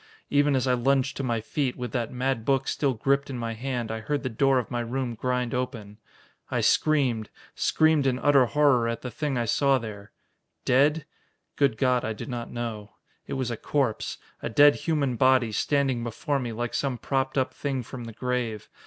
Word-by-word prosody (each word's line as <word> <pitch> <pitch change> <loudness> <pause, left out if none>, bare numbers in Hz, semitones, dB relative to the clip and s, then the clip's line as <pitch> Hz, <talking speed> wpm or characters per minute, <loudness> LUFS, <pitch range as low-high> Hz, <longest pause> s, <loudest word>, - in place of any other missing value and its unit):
Even 145 0 +3
as 130 - +1
I 130 - +2
lunged 135 +2 +1
to - - -2
my 115 -3 -1
feet, 130 +3 -2
with 125 -2 -4
that 120 -3 -2
mad 125 -2 -1
book 135 +1 +1
still 135 -4 0
gripped 140 +5 +1
in 130 - -4
my 115 -1 -3
hand, 120 -1 -3
I 110 - -3
heard 145 +6 -2
the 130 - -1
door 135 +4 +3
of 125 - -2
my 120 - -1
room 120 +1 -2
grind 125 +1 -1
open. 115 -5 -4 0.5
I - - 0
screamed, 130 -8 +2 0.2
screamed 155 -3 +2
in 125 -1 +1
utter 135 -2 +4
horror 140 -4 +3
at 115 0 -3
the 125 - -5
thing 145 -2 -2
I 120 - 0
saw 135 +4 +3
there. 105 -4 -8 0.5
Dead? 145 +4 +3 0.5
Good 140 -6 +2
God, 125 -1 +2
I 110 - -2
do - - -7
not 120 -4 -5
know. 110 -3 -5 0.3
It - - -4
was 130 -2 -2
a 115 - -3
corpse, 135 -5 -1 0.2
a - - -3
dead 145 +5 +7
human 145 -7 -1
body, 130 -3 +4
standing 135 0 0
before 130 +5 -2
me 120 -3 -4
like 120 +1 -4
some 135 -3 -1
propped 135 +2 -1
up 130 0 +1
thing 135 -3 -3
from 120 +1 -8
the 115 - -8
grave. 120 -2 -3
125 Hz, 200 wpm, -26 LUFS, 115-140 Hz, 0.5 s, dead